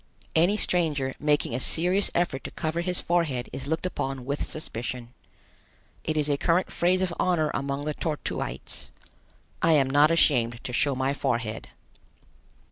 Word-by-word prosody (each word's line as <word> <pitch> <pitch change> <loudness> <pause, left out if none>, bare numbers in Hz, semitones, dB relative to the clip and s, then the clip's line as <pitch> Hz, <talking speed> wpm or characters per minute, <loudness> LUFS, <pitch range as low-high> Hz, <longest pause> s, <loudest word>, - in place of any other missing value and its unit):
Any 175 +6 +4
stranger 150 -9 +1
making 150 -5 +1
a 125 - -1
serious 180 +8 +3
effort 170 -6 0
to - - -3
cover 160 +2 -2
his 180 0 +2
forehead 160 -8 -1
is 135 - -4
looked 160 +4 -1
upon 135 -7 -3
with 140 +2 -3
suspicion. 120 -4 -4 0.9
It 155 - -2
is 150 -1 +1
a 145 -1 +1
current 175 +2 +1
phrase 185 +2 +2
of 180 -2 -1
honor 165 -4 +2
among 140 +1 -2
the 150 - -1
Tor 155 0 -2
tuites: - - -4 0.7
"I 165 - +4
am 140 -3 +4
not 145 +3 +5
ashamed 120 -8 +3
to 125 - -5
show 140 +3 +2
my 130 +2 0
forehead." 115 -6 -2
150 Hz, 160 wpm, -26 LUFS, 135-170 Hz, 0.9 s, not